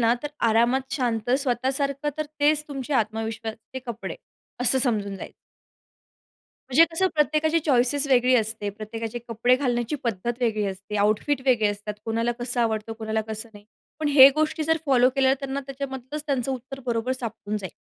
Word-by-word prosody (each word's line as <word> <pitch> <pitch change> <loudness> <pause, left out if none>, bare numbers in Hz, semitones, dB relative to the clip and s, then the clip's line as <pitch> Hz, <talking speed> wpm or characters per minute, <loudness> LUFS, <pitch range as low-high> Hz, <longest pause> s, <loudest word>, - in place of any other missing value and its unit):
ना 230 0 +4
तर 295 - -3 0.2
आरामात 245 +4 +2
शांत 245 -4 -1
स्वतःसारखं 275 +2 -1
तर 310 - -1
तेच 300 +1 +3
तुमचे 275 0 -5
आत्मविश्वासचे 225 +1 -3
कपडे 235 -1 -5 0.4
असं 250 +2 +5
समजून 210 -6 0
जायचं. - - -9 1.4
म्हणजे 305 +6 +6
तसं 375 +3 +2
प्रत्येकाची 310 +2 +2
चॉइसेस 280 -1 +2
वेगळी 255 -1 +4
असते, 220 -2 -1
प्रत्येकाचे 225 +3 -6
कपडे 235 +2 +3
घालण्याची 245 0 -1
पद्धत 235 0 -1
वेगळी 215 -3 +1
असते, 195 +2 -5
आउटफिट 215 +7 +1
वेगळे 230 -5 +4
असतात, 205 +1 -5
कोणाला 230 +1 0
कसं 240 0 -1
आवडतं, 225 0 -1
कोणाला 220 0 -2
कसं 220 +1 -6
नाही. 205 0 -14 0.3
पण 305 - 0
ह्या 275 -1 +10
गोष्टी 310 0 0
जर 320 +1 +2
फॉलो 255 -2 +4
केल्या, 265 -1 +4
त्यांना 275 0 -3
त्याच्यामधलंच 275 +1 -6
त्यांचं 270 -2 0
उत्तर 265 +1 -6
बरोबर 240 +1 -1
सापडून 225 -4 -4
जाईल, 190 -4 -7
245 Hz, 160 wpm, -25 LUFS, 220-275 Hz, 1.4 s, ह्या